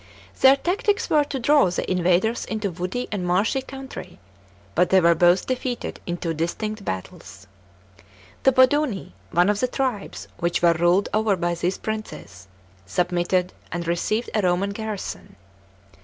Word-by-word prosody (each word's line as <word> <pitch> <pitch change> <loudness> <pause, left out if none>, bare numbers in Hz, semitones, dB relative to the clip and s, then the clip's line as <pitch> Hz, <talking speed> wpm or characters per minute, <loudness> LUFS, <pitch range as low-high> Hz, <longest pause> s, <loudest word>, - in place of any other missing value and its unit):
Their 265 +1 +7
tactics 405 +8 -1
were 300 -1 +5
to 280 - -4
draw 285 -3 +4
the 175 - -3
invaders 185 +5 +1
into 215 -3 -3
woody 185 +8 -4
and 205 -4 -2
marshy 195 +9 +1
country, 265 0 -9 0.6
but 180 +2 +2
they 190 - +6
were 170 -1 +5
both 175 +2 +3
defeated 255 -1 -3
in 175 0 -2
two 165 -1 -2
distinct 205 +7 -3
battles. 95 - -7 1.0
The 265 - +5
Boduni, 260 -4 +2 0.2
one 175 +2 +3
of 205 0 +1
the 255 - +1
tribes 210 - -3
which 170 +1 -1
were 170 -1 +6
ruled 175 +4 +2
over 215 -1 +2
by 175 -1 -1
these 175 +2 -1
princes, 215 - -7 0.4
submitted, 180 - 0 0.2
and 170 0 -3
received 215 +7 -1
a 215 - +2
Roman 185 +2 +1
garrison. 215 - -6
195 Hz, 150 wpm, -23 LUFS, 175-240 Hz, 1.0 s, Their